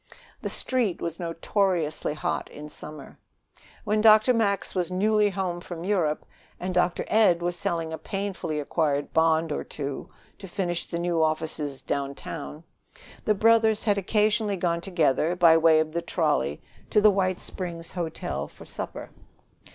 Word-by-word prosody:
The - - -3
Street 240 -8 0
was 165 -1 -4
notoriously 165 -2 0
hot - - -2
in 150 +1 -9
summer. 150 -1 -10 0.6
When 215 0 +1
Dr. 215 +3 +6
Max 200 -4 0
was 180 -2 -1
newly 210 +3 +2
home 180 -2 -3
from 175 -1 -7
Europe, 175 -6 0 0.3
and 185 +1 -3
Dr. 180 0 +1
Ed 180 -6 +4
was 175 0 0
selling 165 -2 -2
a 160 - -5
painfully 195 -6 -3
acquired 145 -1 -1
bond 160 0 +3
or - - -2
two 140 -2 -6 0.3
to 195 - -8
furnish 175 -2 -2
the 170 - -3
new 170 -1 0
offices 155 -3 -1
downtown, 140 +2 -4 0.6
the 215 - +3
brothers 220 0 +4
had 205 -2 +2
occasionally 210 +1 +1
gone 170 -1 0
together, 170 -2 +1
by 170 -2 +6
way 160 -1 +5
of 155 0 0
the 170 +1 -2
trolley, - - 0 0.3
to 215 - +4
the 210 0 +6
White 185 -2 0
Springs 170 -3 -6
Hotel 160 - -4
for - - -14
supper. - - -7
175 Hz, 150 wpm, -26 LUFS, 160-200 Hz, 0.6 s, Dr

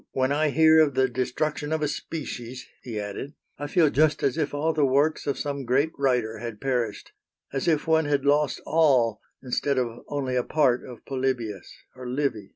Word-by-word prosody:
"When 130 +1 +1
I 150 +1 +2
hear 160 +2 +5
of 150 -4 +3
the 130 0 +3
destruction 150 +4 -2
of 160 -1 0
a - - +2
species," 125 -5 -6 0.2
he 115 -4 -5
added, 105 +8 -6 0.2
"I 145 - -3
feel 160 -2 +3
just 155 +1 +2
as 135 - +2
if 155 -3 -1
all 155 +3 0
the 155 - +1
works 140 +4 +2
of 140 - 0
some 140 -2 -3
great 135 +6 +1
writer 125 -5 0
had 115 -2 -6
perished; 120 -5 -2 0.4
as 135 - -2
if 155 -3 +2
one 160 -1 +3
had 145 -1 0
lost 145 -1 +2
all 130 -9 +3 0.2
instead 135 +2 -1
of 120 -2 -2
only 135 -3 -2
a 125 - +1
part 130 -5 +2
of 125 -3 -11
Polybius 130 -7 -3 0.2
or 125 -1 -7
Livy." 125 -7 -2
135 Hz, 190 wpm, -25 LUFS, 125-150 Hz, 0.4 s, hear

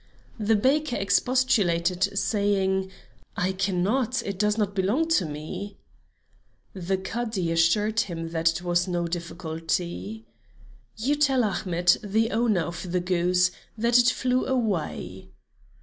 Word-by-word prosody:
The 220 +1 +2
baker 265 +4 +1
expostulated, 195 -5 +1
saying: 195 -2 +1 0.5
"I 185 +1 +1
cannot; 200 +7 0
it 195 -2 -5
does 210 0 +2
not 205 -2 0
belong 205 +12 +1
to 265 - +3
me." 155 +7 -7 1.0
The 190 0 -2
Cadi 195 -2 -3
assured 205 +7 +2
him 165 -6 -3
that 165 +1 0
was 175 +1 +1
no 175 -1 -1
difficulty. 165 - -4 0.7
"You 255 +7 +1
tell 275 -4 +2
Ahmet, 180 -4 +2
the 220 +3 +1
owner 220 -5 +2
of 175 +2 -5
the 180 - +1
goose, 180 0 +2 0.3
that 235 +2 +4
it 245 +1 +5
flew 255 0 0
away." 190 - -2
190 Hz, 120 wpm, -26 LUFS, 175-220 Hz, 1.0 s, it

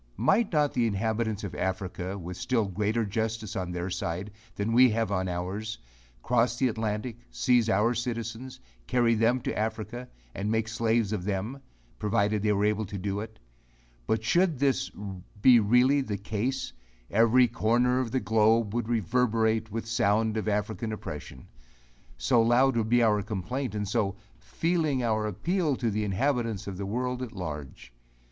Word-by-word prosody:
Might 195 - +2
not 150 -3 +2
the 120 -2 +2
inhabitants 110 +1 -1
of 100 - -5
Africa, 95 0 -3
with 90 -1 -7
still 120 +1 0
greater 105 +4 -1
justice 110 0 -3
on 90 -3 -3
their 90 +1 -3
side, 90 +2 -3 0.2
than 105 +3 -1
we 125 +2 +7
have 115 -1 -1
on 95 -1 0
ours, 95 +5 -4 0.5
cross 120 0 +2
the 130 0 +2
Atlantic, 110 +1 -3
seize 120 -3 +2
our 110 +3 +3
citizens, 115 +1 -4 0.3
carry 120 -2 +3
them 115 +3 +3
into 125 - -3
Africa, 110 +3 -3 0.2
and 100 +2 -3
make 110 0 0
slaves 115 -1 +1
of 95 -4 -3
them, 105 +7 -3 0.4
provided 105 -1 +1
they 105 0 +2
were 100 0 +2
able 105 0 +1
to 100 - -6
do 100 +1 -2
it? 110 +1 -7 0.7
But 110 0 0
should 170 +5 +2
this 135 -1 +1 0.5
be 120 +3 +7
really 125 +6 +4
the 105 -6 -3
case, 120 +7 -3 0.4
every 115 +4 +5
corner 120 +2 +2
of 130 -3 -1
the 130 - 0
globe 110 -1 +2
would 120 -1 -2
reverberate 110 0 +1
with 115 +2 -3
the 115 - -8
sound 110 0 +2
of 110 0 -2
African 105 +2 -1
oppression; 75 -10 -7 0.7
so - - +3
loud 120 +3 +4
would 110 -1 0
be 120 0 +4
our 105 -2 +3
complaint, 110 +4 -3
and 105 -1 -2
so 100 -2 0 0.2
"feeling 160 -6 0
our 110 -2 +1
appeal" 155 - 0
to 120 -3 -1
the 105 +1 -1
inhabitants 115 0 -1
of 95 -2 -6
the 100 0 -4
world 125 +4 -2
at 125 -3 -5
large. 75 - -7
110 Hz, 165 wpm, -28 LUFS, 105-120 Hz, 0.7 s, we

